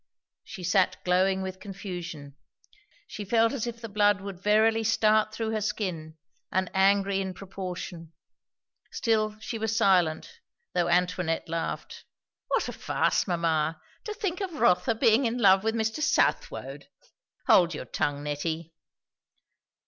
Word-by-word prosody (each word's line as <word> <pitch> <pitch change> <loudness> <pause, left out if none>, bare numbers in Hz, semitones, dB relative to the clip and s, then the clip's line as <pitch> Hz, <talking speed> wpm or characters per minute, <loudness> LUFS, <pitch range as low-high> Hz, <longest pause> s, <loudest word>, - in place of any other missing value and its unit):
She 190 -4 -9
sat 185 +1 +2
glowing 190 +1 +2
with 185 0 -6
confusion; 175 -8 -7 0.7
she 210 - -7
felt 225 +4 +2
as 245 -4 -3
if 235 -1 -6
the 230 - -5
blood 205 -1 +3
would 195 -2 -8
verily 220 +2 +3
start 215 -1 +3
through 220 0 -3
her 215 -1 -1
skin; 180 -7 -3 0.3
and 185 0 0
angry 195 0 +3
in 190 -1 -4
proportion. 180 -3 -7 0.8
Still 215 -2 0
she 225 +1 -5
was 220 0 -1
silent, 190 - +2 0.3
though 175 -1 +1
Antoinette 180 -1 0
laughed. 165 0 -4 0.4
"What - - 0
a - - -5
farce, - - 0
mamma! 165 -2 0 0.3
To 430 - -4
think 395 -3 -3
of 380 -3 -3
Rotha 200 - +2
being 225 +3 +3
in 230 +2 -2
love 195 -4 +5
with 220 +1 0
Mr. 225 +6 -1
Southwode!" - - 0 0.6
"Hold 175 -3 +5
your 140 - -6
tongue, 145 +4 -2
Nettie." 160 +2 -4
195 Hz, 140 wpm, -27 LUFS, 175-220 Hz, 0.8 s, love